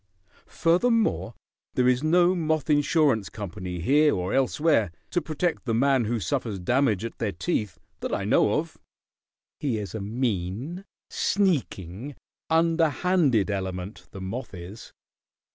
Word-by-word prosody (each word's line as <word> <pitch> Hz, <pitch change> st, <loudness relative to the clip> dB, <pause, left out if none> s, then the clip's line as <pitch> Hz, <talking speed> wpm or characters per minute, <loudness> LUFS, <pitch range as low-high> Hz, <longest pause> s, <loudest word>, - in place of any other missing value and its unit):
Furthermore, 180 Hz, -, +1 dB, 0.4 s
there 125 Hz, -1 st, +3 dB
is 125 Hz, 0 st, +3 dB
no 175 Hz, +3 st, +4 dB
moth 160 Hz, -3 st, 0 dB
insurance 145 Hz, -, +2 dB
company 90 Hz, -4 st, -6 dB
here 145 Hz, -, +4 dB
or 90 Hz, +1 st, -2 dB
elsewhere 135 Hz, -, +2 dB, 0.2 s
to 175 Hz, -, +1 dB
protect 160 Hz, +1 st, -2 dB
the 115 Hz, -3 st, 0 dB
man 135 Hz, 0 st, +3 dB
who 115 Hz, +1 st, -1 dB
suffers 100 Hz, +3 st, -2 dB
damage 115 Hz, +1 st, +1 dB
at 115 Hz, -, -7 dB
their 110 Hz, -3 st, -1 dB
teeth, 100 Hz, -, -2 dB, 0.2 s
that -, -, -4 dB
I -, -, -1 dB
know -, -, +3 dB
of. -, -, -2 dB, 0.8 s
"He 130 Hz, -7 st, -1 dB
is 100 Hz, -4 st, -5 dB
a 110 Hz, -, -4 dB
mean, 115 Hz, -, -3 dB, 0.3 s
sneaking, 140 Hz, -, -1 dB, 0.3 s
underhanded 165 Hz, -, +2 dB
element, 95 Hz, -1 st, -5 dB
the 95 Hz, -, -9 dB
moth 100 Hz, +3 st, -5 dB
is. 90 Hz, +5 st, -10 dB
125 Hz, 130 wpm, -26 LUFS, 100-155 Hz, 0.8 s, no